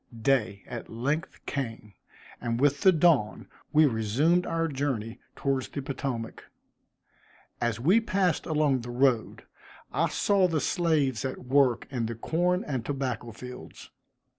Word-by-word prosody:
Day 110 -8 +1
at 120 -2 -7
length 145 +10 -3
came, 115 -6 -5 0.5
and 115 -1 -2
with 145 +1 +2
the 190 - +7
dawn, 155 - +2 0.2
we 155 0 +6
resumed 140 +9 +2
our 165 0 0
journey 130 -6 -3 0.2
towards 135 -2 -1
the - - -6
Potomac. 130 -4 -4 1.2
As 120 -2 0
we 180 - +4
passed 190 -6 0
along 150 -5 +2
the 120 - -8
road, 125 -2 +1 0.5
I - - +1
saw 200 -2 +2
the 165 -3 0
slaves 150 - +1
at 130 -1 -5
work 130 -2 +3
in 120 -4 -1
the 115 - -4
corn 175 - 0
and 130 -5 -3
tobacco 125 -3 -3
fields. 125 +3 -10
135 Hz, 140 wpm, -28 LUFS, 120-155 Hz, 1.2 s, the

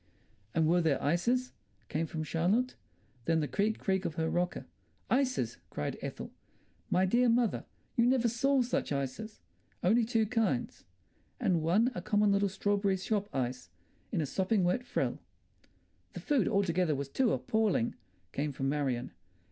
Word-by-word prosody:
"And 165 -1 +3
were 175 +2 +4
there 155 -5 +2
ices?" 235 - +1 0.4
came 160 +2 -1
from 155 0 -4
Charlotte. 190 +11 +1 0.5
Then 165 -1 +2
the 150 - 0
creak, 210 +5 0
creak 190 -1 0
of 170 -4 -3
her 160 0 0
rocker. 180 0 -1 0.5
"Ices!" 255 - +1
cried 75 - -4
Ethel. - - -6 0.6
"My 185 +1 +3
dear 240 +6 +3
mother, 235 -2 +2 0.3
you 235 0 +4
never 250 -2 +3
saw 260 +3 +2
such 240 - -2
ices. 140 - -4 0.4
Only 225 +7 +4
two 225 -1 +2
kinds. 210 - -1 0.5
And 170 -3 +2
one 200 +10 +3
a 180 - -4
common 205 +2 +2
little 200 0 +2
strawberry 200 0 +1
shop 205 +2 -1
ice, 125 -6 -3 0.4
in 165 - 0
a - - 0
sopping 190 +7 +1
wet 180 +8 +1
frill." 245 - -1 0.9
"The - - -6
food 285 -6 +1
altogether 185 -5 +2
was 140 0 -3
too 250 - +2
appalling," 215 - +1 0.4
came 145 0 -2
from 135 +1 -1
Marion. 135 -4 -1
190 Hz, 155 wpm, -31 LUFS, 160-225 Hz, 0.9 s, were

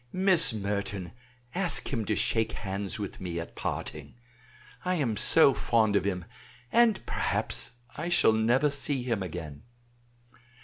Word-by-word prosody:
Miss 185 -7 +6
Merton, 100 -3 -3 0.4
ask 180 -5 0
him 115 -4 -1
to 105 - 0
shake 110 +1 0
hands 95 -1 -4
with 100 -3 -6
me 85 -2 -4
at 85 - -8
parting. - - -5 0.7
I 185 0 0
am 130 -10 0
so 140 +5 +5
fond 110 -5 +1
of 100 - +2
him, 90 -4 -2 0.5
and 230 -3 +3
perhaps - - -2 0.2
I 165 +4 -4
shall 175 -10 +4
never 120 +7 +2
see 140 -2 -1
him 115 -5 -1
again. 80 -5 -6
110 Hz, 140 wpm, -28 LUFS, 100-145 Hz, 0.7 s, Miss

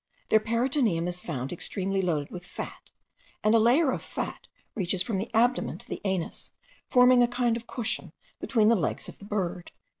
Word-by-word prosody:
Their 220 - +6
peritoneum 230 - +1
is 180 0 -2
found 135 -3 -4
extremely 195 +2 -1
loaded 155 -6 -1
with 180 -1 -7
fat, - - -8 0.5
and 215 - +4
a 230 - +6
layer 260 +6 +4
of - - -3
fat - - -5 0.3
reaches 185 -2 0
from 195 0 -2
the 215 - -3
abdomen 230 - +2
to - - -12
the - - -5
anus, 190 -3 -2 0.4
forming 250 0 +6
a 240 - +5
kind 240 -1 +1
of 230 0 -7
cushion 235 -1 -3 0.3
between 220 -4 +3
the 230 - +5
legs 175 -8 -2
of - - -11
the 200 - -11
bird. 185 -4 -3
215 Hz, 185 wpm, -28 LUFS, 180-235 Hz, 0.5 s, Their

